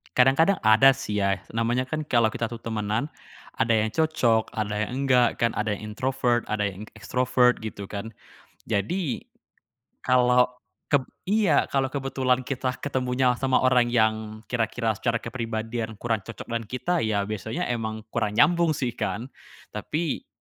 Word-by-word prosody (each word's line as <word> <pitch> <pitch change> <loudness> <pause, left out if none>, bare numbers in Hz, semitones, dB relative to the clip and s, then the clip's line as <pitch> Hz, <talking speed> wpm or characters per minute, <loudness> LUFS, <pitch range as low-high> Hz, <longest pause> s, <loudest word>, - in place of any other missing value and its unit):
Kadang-kadang 135 +9 +4
ada 110 +5 +6
sih 105 -6 -4
ya, 100 -1 +1
namanya 120 +3 -1
kan 155 +1 -3
kalo 120 -6 +3
kita 115 - -3
tuh 115 0 -7
temenan, 110 +4 -2 0.5
ada 115 0 +2
yang 110 0 +2
cocok, 120 -6 +2
ada 105 0 -1
yang 135 +4 -3
nggak 125 -2 +3
kan, 115 0 +1
ada 105 0 0
yang 105 +1 -6
introvert, 125 +1 0
yang 105 -1 -2
ekstrovert 125 +3 +2
gitu 100 -2 -6
kan. 110 +2 -6 0.5
Jadi, 140 - -1 0.8
kalo 125 0 +3 0.3
keb 140 -3 +3 0.2
iya, 195 -6 +3
kalau 135 -1 +1
kebetulan 130 -2 0
kita 130 -1 -2
ketemunya 130 -2 +1
sama 130 -1 +2
orang 125 -2 +4
yang 110 -2 0
kira-kira 115 -1 0
secara 120 -1 0
kepribadian 115 -1 -4
kurang 115 +1 -1
cocok 115 -4 -7
dengan 115 -1 -2
kita, 170 +9 -1
ya 100 -2 +1
biasanya 110 +2 -4
emang 110 -2 -3
kurang 110 -3 -1
nyambung 165 +3 +4
sih 125 -3 -1
kan. 115 +5 -4 0.4
Tapi, 160 -1 -3
120 Hz, 145 wpm, -25 LUFS, 110-130 Hz, 0.8 s, ada